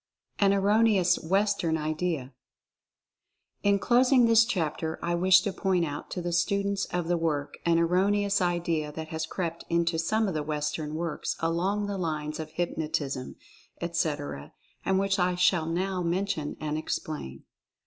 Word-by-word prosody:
AN 200 -1 +5
ERRONEOUS 200 -1 +3
WESTERN 195 -2 +1
IDEA. 155 -3 -2 1.3
In 200 0 +3
closing 250 +3 +4
this 230 0 +6
chapter 160 -7 -2
I 170 - 0
wish 185 +2 +5
to 195 0 -3
point 185 -4 +1
out 145 -1 -6
to 180 - -4
the 175 - -2
students 200 +3 +1
of 175 -2 -3
the 175 0 +1
work 150 -3 -2
an 165 0 +4
erroneous 200 +4 +2
idea 170 -4 0
that 160 0 -6
has 160 0 -3
crept 170 -1 -4
into 170 -1 +1
some 215 +6 +1
of 190 - -2
the 155 - -1
Western 150 0 -3
works 165 -1 -3
along 180 +6 0
the 200 -1 -3
lines 155 -3 -3
of 155 -1 -5
hypnotism, 155 -5 -3 0.4
etc., 145 - -3 0.3
and 190 - +1
which 195 +1 +1
I 180 0 +2
shall 180 -2 +2
now 185 +2 -1
mention 170 -3 -2
and 155 0 -2
explain. 150 - -5
170 Hz, 150 wpm, -28 LUFS, 155-195 Hz, 1.3 s, this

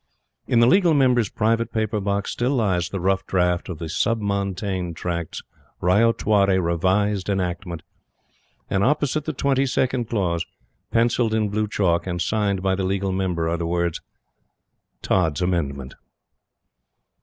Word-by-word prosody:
In 120 - +3
the - - +6
Legal 175 +3 +4
Member's 125 -6 +3
private 115 +2 0
paper 110 -1 -1
box 100 0 -1
still 125 +4 0
lies 95 -7 0
the 95 - -4
rough 95 +1 +1
draft 90 -1 0
of 90 - -5
the 80 - -5
Sub 115 +8 0
Montane 100 -3 -2
Tracts 85 -1 -4 0.4
Ryotwari 100 0 +3
Revised 95 +3 0
Enactment; 90 -3 -3 0.8
and, 95 0 0
opposite 150 +2 +1
the 155 - -1
twenty 135 0 +1
second 125 -2 0
clause, 90 -6 0 0.5
pencilled 115 -1 +2
in 110 -2 +1
blue 105 +1 -1
chalk, 90 -4 0
and 90 -1 -2
signed 100 -1 0
by 95 -1 +2
the 95 0 -1
Legal 95 +1 -1
Member, 90 -3 -1
are 85 +1 0
the 85 0 -3
words 85 -1 -1 1.0
"Tods' 80 -5 +1
Amendment." 70 -8 -2
95 Hz, 145 wpm, -23 LUFS, 90-110 Hz, 1.0 s, the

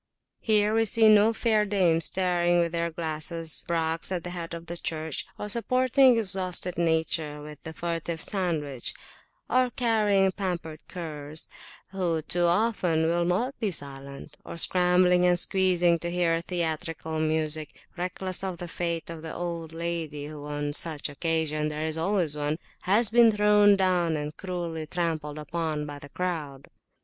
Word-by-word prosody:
Here 215 -1 +3
we 225 0 +3
see 220 +1 +4
no 215 +1 +6
fair 220 -2 +2
dames 180 -5 +2
staring 175 -2 +2
with 170 -1 +1
their 170 0 -1
glasses, 160 0 -3
braques 165 0 -1
at 180 -3 -2
the 180 - -5
Head 170 -1 -5
of 170 0 -9
the 170 - -6
Church; 160 -2 -4
or 210 - -5
supporting 255 +3 +3
exhausted 185 -4 +3
nature 160 -2 0
with 150 0 -10
the 160 - -7
furtive 165 0 -3
sandwich; 160 - -2 0.5
or 255 0 +2
carrying 210 -6 +2
pampered 175 -5 -4
curs 155 -3 -5 0.4
who, 175 -5 -1
too 175 +2 +3
often, 175 -3 +2
will 170 +1 +1
not 235 +10 -1
be 220 -4 0
silent; 140 -2 -8
or - - -8
scrambling 180 0 +4
and 180 0 +4
squeezing 180 -2 +3
to 170 - -3
hear 170 -1 +1
theatrical 160 -2 -3
music, 155 -1 -2
reckless 185 +1 -4
of 185 -2 -3
the 175 - -6
fate 170 -1 -3
of 165 -1 -8
the 160 0 -6
old 170 -2 -4
lady 165 -3 -4
whoon 145 0 -4
such 155 -1 -1
occasions 155 0 -1
there 155 +1 -3
is 160 -1 -1
always 175 -4 +1
onehas 180 +8 0
been 235 0 +7
thrown 210 -1 +5
down 180 -4 +1
and 150 0 -5
cruelly 170 -4 -5
trampled 155 -3 -2
upon 155 0 -3
by 145 -1 -8
the 145 -1 -12
crowd. 150 -6 -4
170 Hz, 155 wpm, -27 LUFS, 155-185 Hz, 0.5 s, been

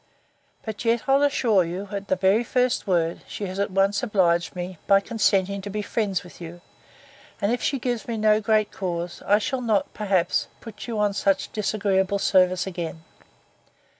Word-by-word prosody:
But 220 0 -5
yet 230 0 +1
I'll 270 +1 +4
assure 245 -9 +3
you, 180 +4 -5
at 200 -1 -5
the 185 - +2
very 190 +5 +3
first 250 -1 0
word, 170 -3 0
she 205 - -5
has 185 +1 -5
once 195 +1 +1
obliged 180 -8 +1
me, 180 -1 -6
by 195 0 +6
consenting 200 -2 0
to 205 - -7
be 210 +1 -3
friends 200 -4 -1
with 180 0 -14
you; 170 +1 -9 0.8
and 200 - +1
if 245 - -1
she 275 - 0
gives 245 -2 -3
me 230 -2 -3
no 215 0 +3
great 215 -1 +2
cause, 175 -2 -4
I 205 - +5
shall 250 +5 -2
not, 220 -5 0
perhaps, 190 -4 0
put 220 -1 -10
you 230 -2 -3
on 210 -1 +1
such 195 -1 0
disagreeable 200 -2 0
service 185 -2 +3
again. 170 -3 -5
200 Hz, 175 wpm, -24 LUFS, 185-220 Hz, 0.8 s, by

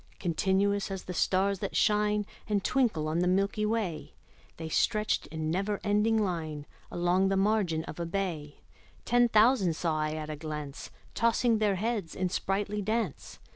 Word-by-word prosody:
Continuous 195 +3 +1
as 190 -1 -5
the 180 - -6
stars 190 +2 +1
that - - -4
shine 210 -1 +2 0.2
And 205 -2 +1
twinkle 225 - +1
on 160 +2 0
the 180 - +2
milky 200 +3 +1
way, 210 -8 -3 0.4
The 160 - -5
stretched 215 +6 +1
in 155 0 -3
never 195 +3 -1
ending 210 +2 +2
line 160 -7 -2 0.2
Along 175 +2 +1
the 195 0 +1
margin 195 -5 +1
of 160 - -8
a 170 - -2
bay: 165 -6 -4 0.4
Ten 245 0 +4
thousand 215 -6 +4
saw 160 -2 -1
I 155 0 -1
at 155 -1 -5
a - - -4
glance, 150 -2 -6 0.2
Tossing 230 0 +2
their 210 -2 +2
heads 210 -3 -2
in 185 -1 -1
sprightly 200 +3 -1
dance. 215 - -3
195 Hz, 165 wpm, -29 LUFS, 165-210 Hz, 0.4 s, Ten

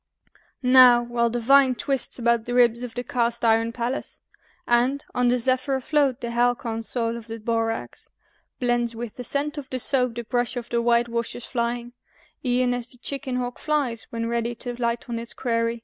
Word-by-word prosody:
Now, 250 -1 +7
while 235 0 0
the 240 +1 -2
vine 265 +2 +5
twists 270 0 -2
about 235 -2 +1
the 245 - -3
ribs 240 -1 +4
of 245 -2 -6
the 245 - -3
cast 235 -1 -1
iron 225 0 +3
Pallas, 240 +3 -3 0.5
And, 250 +4 +2
on 250 0 +2
the 245 +1 +3
zephyr 255 +2 +1
afloat, 275 -1 +1
the 235 - -4
halcyon 235 -1 0
soul 230 +1 -1
of 230 -1 -10
the 225 0 -6
borax 225 0 -3 0.5
Blends 240 -1 0
with 230 -1 -6
the 250 - -5
scent 290 +4 -1
of 275 - -10
the 260 - -2
soap, 250 -2 +1
the 235 - -4
brush 245 +2 -1
of 240 -1 -5
the 235 0 +1
white 235 0 +3
washer's 235 0 -3
flying 240 0 -3 0.5
E'en 250 -1 +1
as 245 -1 -3
the 250 - -13
chicken 270 +1 -4
hawk 245 -1 -3
flies 280 -7 -1
when 230 0 -3
ready 235 0 -1
to 245 +1 -5
light 235 0 -1
on 235 -1 -3
its 230 0 -6
quarry. 230 -1 -1
240 Hz, 195 wpm, -24 LUFS, 235-250 Hz, 0.5 s, Now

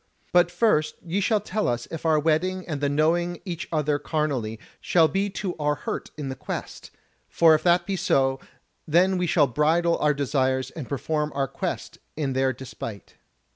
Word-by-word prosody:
But 175 -1 +5
first 175 -5 +2
ye 175 +4 -1
shall 210 +1 +2
tell 215 +1 -2
us 120 0 -1
if 165 0 -3
our 155 -1 +4
wedding 175 +5 0
and 150 -4 -4
the 145 - +1
knowing 170 +4 +1
each 175 -1 -5
other 150 -2 +1
carnally 135 -10 -2 0.2
shall 165 -3 +4
be 195 +4 -1
to 190 -2 -4
our 150 -1 +1
hurt - - -5
in 145 -2 -4
the 130 - -4
Quest; - - -6 0.4
for 165 -1 +5
if 155 - +3
that 175 0 +3
be 195 - -2
so, 135 -7 +1 0.5
then 180 +3 +3
shall 155 -3 +4
we 125 - -9
bridle 170 +4 +2
our 150 -1 +2
desires 130 -2 0
and 150 -7 -8
perform 150 +2 -1
our 135 -1 0
Quest - - -5 0.2
in 140 -4 -1
their 130 0 +2
despite." 115 -6 -8
155 Hz, 180 wpm, -25 LUFS, 140-175 Hz, 0.5 s, But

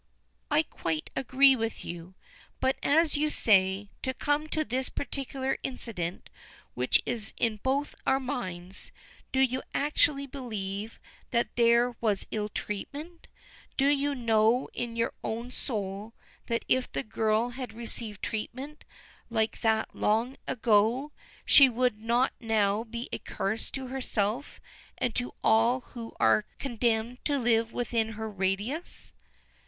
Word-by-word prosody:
"I 300 +1 +4
quite 160 - -3
agree 265 +1 +5
with 225 -2 -3
you; 175 +2 -7 0.4
but, 265 +1 +2
as 315 +2 +3
you 300 +1 +2
say, 195 -5 +3
to 260 0 -2
come 290 +3 0
to 310 0 -1
this 255 +1 -1
particular 270 -1 -3
incident 200 -9 -4 0.5
which 125 +1 +2
is 225 -3 -3
in 225 -2 +1
both 270 +6 0
our 265 0 +4
minds, 190 -9 -4 0.4
do 265 - +1
you 260 -1 +3
actually 285 -1 +2
believe 220 -6 -5 0.3
that 235 -1 0
there 235 +1 +4
was 210 -4 +1
ill 210 -1 -1
treatment? 290 - -6 0.5
Don't 280 +1 +4
you 285 0 0
know 230 0 +3
in 235 -1 -4
your 230 0 0
own 235 +3 -3
soul 210 -3 -4 0.3
that 230 -1 -1
if 255 0 +2
the 140 - -2
girl 220 - +1
had 250 0 -6
received 225 -2 -3
treatment 260 +7 -5 0.4
like 220 -1 0
that 220 -1 +2
long 230 +5 +1
ago 235 +4 +3 0.3
she 275 -2 +8
would 245 -2 +1
not 240 +3 +2
now 220 -2 +2
be 235 +1 -6
a - - -3
curse 215 +3 -3
to 265 -1 -4
herself 250 -1 -1 0.4
and 245 - 0
to 245 +2 -3
all 230 +3 +4
who 230 -2 -9
are 110 -1 +4
condemned 235 -1 -1
to 290 -1 +2
live 230 -2 +2
within 230 -2 -1
her 220 +1 -4
radius?" 200 - -2
235 Hz, 135 wpm, -29 LUFS, 215-265 Hz, 0.5 s, she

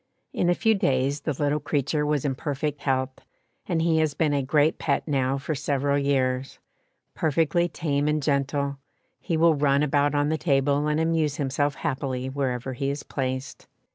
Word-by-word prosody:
In 175 - +1
a 175 - +3
few 225 +4 +3
days 140 -7 +1
the 155 - -2
little 145 +2 0
creature 150 +1 -1
was 150 -2 0
in 135 - +1
perfect 145 +1 -3
health, 130 -1 -1 0.5
and 165 -2 0
he 165 -1 +3
has 155 -3 +1
been 155 -3 +1
a 140 - +1
great 145 +3 +2
pet - - -1
now 135 -2 +1
for 140 +3 -3
several 140 0 0
years; 135 -2 0 0.6
perfectly 165 +3 +1
tame 145 -3 -1
and 150 -1 0
gentle, 140 0 0 0.4
he 165 -4 -2
will 165 0 +5
run 140 -1 +2
about 145 0 +2
on 145 0 +2
the 160 0 -1
table 145 -1 +2
and 150 +1 +1
amuse 160 -3 +1
himself 145 0 -1
happily 130 -4 -3
wherever 130 -2 -2
he 135 +2 -2
is 140 +1 -4
placed. 130 0 -4
145 Hz, 175 wpm, -25 LUFS, 135-155 Hz, 0.6 s, will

